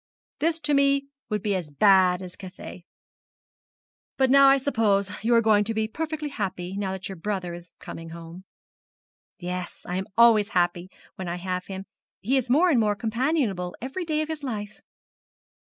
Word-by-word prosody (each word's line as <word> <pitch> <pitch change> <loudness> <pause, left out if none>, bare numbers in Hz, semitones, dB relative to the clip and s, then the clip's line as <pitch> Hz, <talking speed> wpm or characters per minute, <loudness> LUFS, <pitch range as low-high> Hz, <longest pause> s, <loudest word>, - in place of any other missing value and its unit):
This 325 +1 +1
to 295 - 0
me 275 0 +3 0.2
would 210 -3 -2
be 205 - +1
as 180 -5 -3
bad 185 +2 +4
as 180 -1 -9
Cathay. 185 -2 -10 1.3
But 265 -1 +3
now 275 0 +7
I 275 - +6
suppose 215 -7 +1
you 235 +1 +3
are 230 - +4
going 210 -1 +4
to 225 +1 -2
be 220 0 0
perfectly 310 +4 -4
happy, 190 -6 -4
now 200 -1 -2
that 190 0 -5
your 195 - -7
brother 185 -1 -3
is 175 0 -11
coming 165 0 -9
home.' 170 +2 -10 0.9
'Yes. 180 0 -6
I 180 - -2
am 190 - -3
always 225 -3 +6
happy, 175 +1 +1 0.3
when 185 - -5
I 170 - -2
have 180 0 -4
him 190 0 -6 0.3
he 250 +7 0
is 260 -2 0
more 335 +8 +4
and 260 - +4
more 210 -2 +2
companionable 225 - -1
every 270 +9 -4
day 310 -2 0
of - - -6
his 315 -1 -5
life.' 210 -6 -5
205 Hz, 180 wpm, -25 LUFS, 180-265 Hz, 1.3 s, now